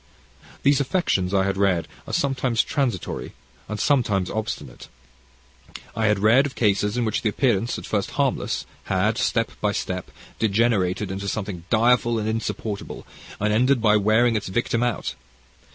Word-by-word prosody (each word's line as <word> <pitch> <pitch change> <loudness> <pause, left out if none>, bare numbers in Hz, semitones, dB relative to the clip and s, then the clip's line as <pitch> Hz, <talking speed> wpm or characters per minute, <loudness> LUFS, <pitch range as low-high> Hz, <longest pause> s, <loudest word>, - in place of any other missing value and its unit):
"These 140 0 +4
affections, 130 - 0
I 95 -1 +3
had 95 0 -1
read, 95 -5 +1 0.2
are - - -6
sometimes 130 -4 +1
transitory 125 - -2 0.4
and 105 0 -4
sometimes 105 -9 +1
obstinate. 110 +1 -5 1.1
I 110 0 +1
had 105 -1 +3
read 115 +8 +4
of 135 - -11
cases 105 0 +1
in 120 - +1
which 110 -1 -1
the 110 - +1
appearance, 115 -1 +1
at - - -8
first - - -1
harmless, - - 0 0.2
had, - - +1
step - - +1
by - - +1
step, 90 0 -3 0.3
degenerated 105 -3 +1
into 100 +1 -4
something 95 -4 -4
direful 120 0 +3
and 110 -1 -2
insupportable, 110 -2 -4 0.3
and 105 +1 +1
ended 125 +4 +3
by 110 -2 +4
wearing 110 +3 +3
its 105 - -2
victim 115 +4 0
out. 120 -2 -1
110 Hz, 150 wpm, -23 LUFS, 100-120 Hz, 1.1 s, These